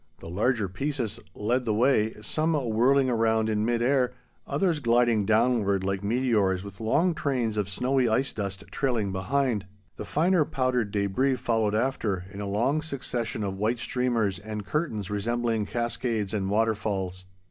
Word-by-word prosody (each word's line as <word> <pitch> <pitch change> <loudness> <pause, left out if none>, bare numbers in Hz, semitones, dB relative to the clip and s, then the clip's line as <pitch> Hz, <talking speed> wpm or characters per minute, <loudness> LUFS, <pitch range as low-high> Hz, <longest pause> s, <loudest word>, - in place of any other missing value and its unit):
The - - -9
larger 110 +3 +1
pieces 120 +1 -3 0.2
led 120 +5 0
the 110 -3 0
way, 110 -2 +2
some 155 +9 0
whirling 130 +1 +3
around 110 -2 +2
in 105 -1 0
mid 120 +1 +1
air, 125 -1 +2 0.3
others 160 +2 +1
gliding 120 -4 +3
downward 110 -4 +2
like 95 0 -2
meteors 105 -5 +1
with 100 -1 -10
long 160 +11 +2
trains 130 -8 -1
of 105 -2 -1
snowy 125 +4 +1
ice 130 +5 +1
dust 100 -2 -4
trailing 120 -8 0
behind. 110 +1 0 0.3
The - - -5
finer 170 +2 +3
powdered 130 -6 0
debris 105 +7 +1
followed 115 -4 0
after, 110 -6 -1
in 100 0 -7
a 100 - -3
long 120 +10 +1
succession 125 -7 -3
of 95 -1 -3
white 110 +4 +1
streamers 115 -5 0
and 105 0 -6
curtains 110 - -2
resembling 115 +1 -1
cascades 120 -3 -2
and 95 -2 -1
waterfalls. 100 -4 -1
115 Hz, 155 wpm, -27 LUFS, 105-130 Hz, 0.3 s, whirling